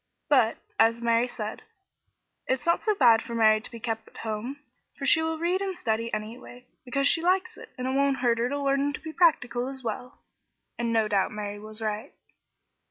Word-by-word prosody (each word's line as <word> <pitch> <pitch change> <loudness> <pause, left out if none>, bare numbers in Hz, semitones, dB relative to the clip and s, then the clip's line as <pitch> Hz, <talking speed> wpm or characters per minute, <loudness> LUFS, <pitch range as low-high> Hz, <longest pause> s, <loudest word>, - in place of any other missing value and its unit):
But, 245 -6 +4 0.2
as 230 +1 +4
Mary 235 +1 +2
said, 220 -3 -6 0.9
"It's 260 -1 -1
not 340 - +2
so 430 -2 +1
bad 235 - +6
for 235 - -6
Betty 215 -1 +5
to - - -7
be 230 - -9
kept 225 -2 -4
at - - -16
home, 225 +5 -4 0.4
for 275 - -4
she 320 +4 +5
will 320 0 -1
read 350 +4 0
and 385 -2 -3
study, 230 -6 -1
anyway, 235 +3 -7 0.2
because 275 +2 +1
she 330 - +3
likes 370 +2 +1
it, - - -12
and 250 - -4
it 260 - 0
won't 275 0 +2
hurt 240 -2 +1
her 240 +1 +1
to 285 - -2
learn 275 +1 +1
to - - -5
be 315 0 -7
practical 250 -9 +2
as 265 -1 -6
well;" 245 +3 -5 0.6
and 235 -1 -2
no 225 -1 +2
doubt 200 -3 +1
Mary 205 -1 -5
was 215 +1 -7
right. 215 0 -3
245 Hz, 205 wpm, -27 LUFS, 225-280 Hz, 0.9 s, bad